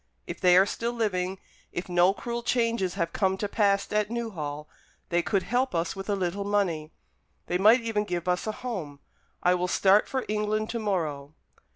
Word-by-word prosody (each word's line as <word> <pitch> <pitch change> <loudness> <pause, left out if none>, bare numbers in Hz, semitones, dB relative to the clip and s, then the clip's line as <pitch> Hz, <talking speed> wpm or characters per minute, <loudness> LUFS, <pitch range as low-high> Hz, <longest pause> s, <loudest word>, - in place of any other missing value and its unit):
If - - -7
they 180 -1 +6
are 190 - +7
still 235 +3 -3
living, 190 -5 -1 0.3
if 175 - -4
no 175 +1 +4
cruel 235 +4 -4
changes 230 -6 0
have 170 0 -2
come 190 -2 +1
to 205 - -2
pass 200 -1 +1
at 210 0 +1
Newhall, 160 -11 -4 0.4
they 175 0 +2
could 195 +2 0
help 250 -1 0
us 165 +1 -1
with 195 +1 -7
a 205 - +2
little 190 +1 -2
money. 185 -7 0 0.5
They 180 - -1
might 220 +6 +6
even 220 -2 -1
give 175 -2 -3
us 180 +3 0
a - - +1
home. 165 - -4 0.4
I 180 - +5
will 180 0 0
start 195 +3 +4
for 260 -1 -2
England 215 +1 -1
to 235 - -3
morrow." 155 -8 -2
195 Hz, 190 wpm, -27 LUFS, 175-215 Hz, 0.5 s, are